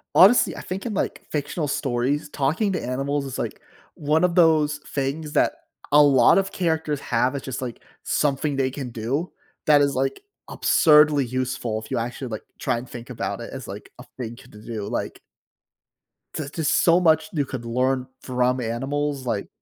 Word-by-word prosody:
Honestly, 205 +7 +6
I - - -7
think 185 +2 -5
in, 235 - -3
like, - - -2
fictional 150 +1 -2
stories, 135 +2 -1
talking 155 +9 0
to 180 - -2
animals 135 +3 -1
is, 135 -2 -6
like, - - -4 0.3
one 155 +3 +1
of 180 -1 +2
those 155 -4 +4
things 145 +2 -3
that - - +3 0.4
a 150 +1 +7
lot 140 -2 +6
of 195 - -1
characters 160 -4 -1
have, 125 +2 0
it's, 140 - -5
just, 130 -1 -4
like, 120 -2 -5 0.2
something 145 0 0
they 130 -1 +1
can 130 -2 -6
do, 125 - -3 0.3
that 150 -1 +6
is, 140 -1 +2
like, 135 - -1 0.3
absurdly 150 -3 +5
useful 125 -3 -2
if 110 - -13
you - - -1
actually, 120 +3 -3
like, 110 -2 -5 0.2
try, - - 0
and 120 +2 -7
think 120 -1 -9
about - - -4
it - - -7
as, - - -7
like, - - -9
a - - -10
thing 120 -2 -5
to - - -16
do, 105 0 -7
like - - -4 1.2
there's, 145 -3 -4
just, 160 -4 +1
so 170 +1 +5
much 160 -1 +3
you 150 -5 0
could 130 -3 -6
learn 125 +2 0 0.2
from 125 0 0
animals 135 +4 -2
like 105 -4 -2
140 Hz, 185 wpm, -24 LUFS, 125-150 Hz, 1.2 s, a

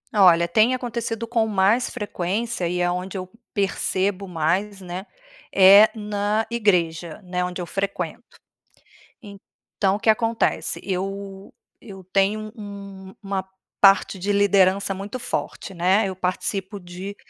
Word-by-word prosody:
Olha, 175 -4 +6
tem 215 +8 +3
acontecido 235 -2 -3
com 230 -1 +1
mais 210 +4 +2
frequência 205 -2 -3
e 180 +1 -2
é 175 0 +2
onde 180 +2 -4
eu 185 -1 -6 0.2
percebo 195 -1 -1
mais, 180 +4 -1
né, 185 +1 -7 0.5
é 200 +3 +8
na 210 0 -1
igreja, 175 -8 0
né, 180 0 -2
onde 180 0 -4
eu - - -4
frequento. 195 +3 -4 1.0
Então 200 -1 -4
o - - -9
que - - -2
acontece, 225 +1 +1
eu 195 +1 -5 0.3
eu 195 -3 -11
tenho 210 +2 +1
um 200 -2 -9
uma 195 -1 -3 0.3
parte 195 0 +5
de 200 +3 -1
liderança 200 -1 +3
muito 200 +6 -6
forte, 215 -4 -4
né. 185 +5 +3
Eu 190 - -6
participo 190 +2 -3
de 180 +3 -8
195 Hz, 130 wpm, -23 LUFS, 185-210 Hz, 1.0 s, é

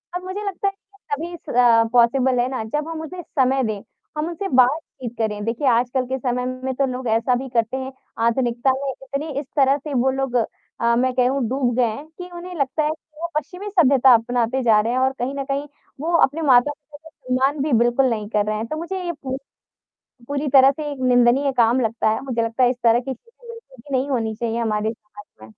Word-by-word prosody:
अब 360 - -3
मुझे 390 +3 -5
लगता 395 +1 -2
है 390 - 0 0.4
तभी 340 +4 -4
स 235 -6 +3
पॉसिबल 250 +1 +3
है 245 - +2
ना, 255 -4 -3
जब 295 +8 -3
हम 320 -1 -5
उसे 355 +3 -7 0.2
समय 265 +1 +3
दें, 215 -3 -2 0.4
हम 305 +2 -1
उनसे 345 +3 -4
बातचीत 255 -1 +1
करें। 210 -2 -2
देखिए 235 +5 -1
आजकल 250 +2 +1
के 260 +1 -3
समय 250 0 -1 0.2
में 265 0 -1
तो 275 +1 +2
लोग 250 -1 -5
ऐसा 230 +3 +2
भी 265 +2 -4
करते 230 +2 0
हैं, 265 0 -5 0.3
आधुनिकता 240 +2 +1
में 275 +1 -3
इतनी 275 +4 -6
इस 290 - -6
तरह 275 +1 +4
से 290 0 -7
वो 260 +1 +2
लोग 265 -2 -2
अ, 235 0 -1
मैं 255 +1 +1
कहूँ 255 +2 +1
डूब 255 -2 0
गए 245 - +4
हैं 230 +7 -4
कि 360 0 -8
उन्हें 360 +1 -8
लगता 275 +3 0
है 300 - +1
कि 310 0 -9
वो 340 - -1
पश्चिमी 360 +8 -5
सभ्यता 275 - +5
अपनाते 240 +2 +1
जा 220 -3 +5
रहे 230 +2 -1
हैं 255 - +1
और 265 0 +2
कहीं 250 +3 -2
न 275 - -2
कहीं 285 +2 -2 0.3
वो 335 +2 -2
अपने 300 +4 +1
मातृभाषा 290 +3 +1
से 255 -4 -6
मान 270 +2 +1
भी 300 - -1
बिल्कुल 240 +3 +3
नहीं 215 -3 -2
कर 210 -2 +1
रहे 215 0 -1
हैं। 220 - -3
तो 310 - -4
मुझे 370 +3 -4
ये 345 - -1
पूछ 270 -4 -6 0.9
पूरी 285 +1 -2
तरह 270 +1 +8
से 295 +1 -5
एक 275 - -7
निंदनीय 245 +3 +4
काम 240 +2 +4
लगता 225 -1 0
है, 220 +4 -1
मुझे 245 -4 -1
लगता 230 +3 0
है 245 - +5
इस 250 - -2
तरह 230 +1 +5
की 265 +1 -4
चीज़ें 465 - -20
बिल्कुल 460 - -12
भी 265 +3 -3
नहीं 270 +3 -1
होनी 225 -4 -1
चाहिए 235 0 -2
हमारे 215 -1 0
समाज 210 -2 -14 0.2
में। - - -12
260 Hz, 230 wpm, -22 LUFS, 235-290 Hz, 0.9 s, तरह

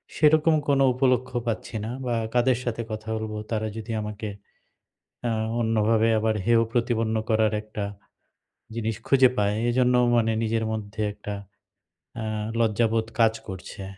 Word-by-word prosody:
সেরকম 155 +1 +4
কোন 140 -1 +3
উপলক্ষ্য 130 -1 +1
পাচ্ছি 115 +1 -3
না - - -4 0.2
বা 120 - 0 0.2
কাদের 125 0 +3
সাথে 120 -1 -2
কথা 110 0 -6
বলব? 110 0 -4 0.2
তারা 110 -1 0
যদি 110 +1 -6
আমাকে 105 +1 -5 1.0
আ - - 0 0.3
অন্যভাবে 110 0 +2
আবার 110 0 +1
হেয় 115 0 +4
প্রতিপন্ন 115 -2 +1
করার 110 -1 +3
একটা 105 -1 -5 0.9
জিনিস 115 -2 -1
খুঁজে 130 -2 +6
পায়। 105 0 +2
এজন্য 125 +1 +3 0.2
মানে 115 -1 +3
নিজের 110 0 0
মধ্যে 110 0 -4
একটা 105 0 -6 0.9
আ - - -3 0.4
লজ্জাবোধ 115 0 +2
কাজ 115 -1 +5
করছে। 95 +1 -7
115 Hz, 135 wpm, -25 LUFS, 110-120 Hz, 1.0 s, খুঁজে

